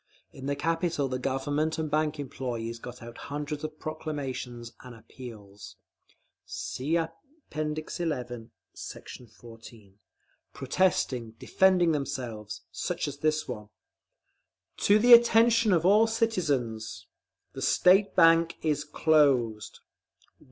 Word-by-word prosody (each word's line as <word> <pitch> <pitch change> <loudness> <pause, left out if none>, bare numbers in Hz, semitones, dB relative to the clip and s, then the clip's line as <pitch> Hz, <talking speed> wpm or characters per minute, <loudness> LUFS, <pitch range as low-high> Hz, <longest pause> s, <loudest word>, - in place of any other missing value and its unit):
In 135 0 -8
the 140 - 0
capital 165 -2 -1
the 130 -1 -3
Government 145 +4 -1
and 155 -2 -3
bank 155 0 0
employees 120 -4 -5
got 125 +1 -10
out 120 0 -10
hundreds 145 +1 -4
of 155 0 -6
proclamations 135 -7 -5
and 125 -2 -11
appeals 110 -3 -12 0.7
(See 150 +6 -3
App. 165 -1 -3 0.4
XI, 155 +1 -3 0.9
Sect. - - -9 0.2
14), 115 -4 -15 0.5
protesting, 130 -6 0
defending 185 +1 +3
themselves, 120 -8 -4
such - - -3
as 145 0 -7
this 155 0 0
one: 105 -5 -7 1.1
TO 205 - +4
THE 240 +3 +7
ATTENTION 230 -1 +6
OF 170 -2 +2
ALL 210 +4 +5
CITIZENS. 150 - -1 0.5
THE - - -7
STATE 195 +2 +4
BANK 165 0 +5
IS 150 -2 0
CLOSED! 135 -9 +1
145 Hz, 110 wpm, -28 LUFS, 120-165 Hz, 1.1 s, THE